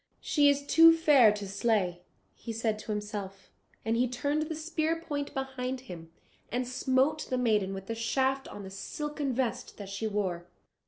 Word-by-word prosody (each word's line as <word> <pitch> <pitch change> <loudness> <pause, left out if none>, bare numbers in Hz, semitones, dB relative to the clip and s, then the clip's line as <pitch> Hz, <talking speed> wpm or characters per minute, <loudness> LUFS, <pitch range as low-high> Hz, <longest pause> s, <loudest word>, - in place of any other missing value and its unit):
"She 290 -2 +3
is 285 0 +1
too 330 +2 +7
fair 280 -9 +6
to 205 -1 -5
slay," 195 -3 0 0.3
said 225 -2 -2
he - - -13
to - - -4
himself, 205 -2 -5 0.3
and 225 +1 +1
he 250 +2 +2
turned 285 +5 -1
the 310 +1 -3
spear 320 +1 -1
point 290 -3 -4
behind 265 -1 -3
him, 170 -9 -10 0.4
and 245 +1 -1
smote 260 +4 +1
the 255 - 0
maiden 215 -6 +2
with 195 0 -6
the 230 - -3
shaft 265 +4 0
on 205 - -8
the 190 - -8
silken 295 +7 -4
vest 250 -2 -2
that 200 -2 -8
she 200 +3 -3
wore. 185 -5 -2
245 Hz, 175 wpm, -30 LUFS, 205-285 Hz, 0.4 s, too